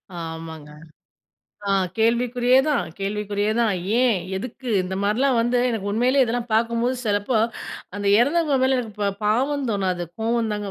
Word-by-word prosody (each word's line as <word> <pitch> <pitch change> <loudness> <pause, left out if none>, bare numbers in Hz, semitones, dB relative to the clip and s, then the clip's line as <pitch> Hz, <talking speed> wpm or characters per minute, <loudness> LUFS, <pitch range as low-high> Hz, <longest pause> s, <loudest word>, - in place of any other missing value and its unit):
ஆமாங்க. 160 -2 -7 1.0
அ - - +1 0.3
கேள்விக்குறியே 245 +2 +3
தான். 290 -10 +1
கேள்விக்குறியே 205 +1 -1
தான். 225 -3 +2 0.3
ஏன்? 235 -6 +3 0.2
எதுக்கு? 250 +5 -6
இந்த 185 +1 -4
மாரிலாம் 245 +4 +2
வந்து 240 +2 +1
எனக்கு 205 -3 -2
உண்மையிலேயே 255 +4 +3
இதெல்லாம் 235 0 -3
பார்க்கும்போது 235 +3 +1
சிலப்போ, 210 +2 +1 0.6
அந்த 205 0 -3
இறந்தவங்க 290 +1 +2
மேல 260 -1 +2
எனக்கு 225 -4 -5
ப 200 - +2 0.2
பாவம் 265 +5 +1
தோணாது. 185 -3 -1 0.2
கோவம் 230 -1 0
தாங்க 205 -1 -4
230 Hz, 140 wpm, -23 LUFS, 205-250 Hz, 1.0 s, கேள்விக்குறியே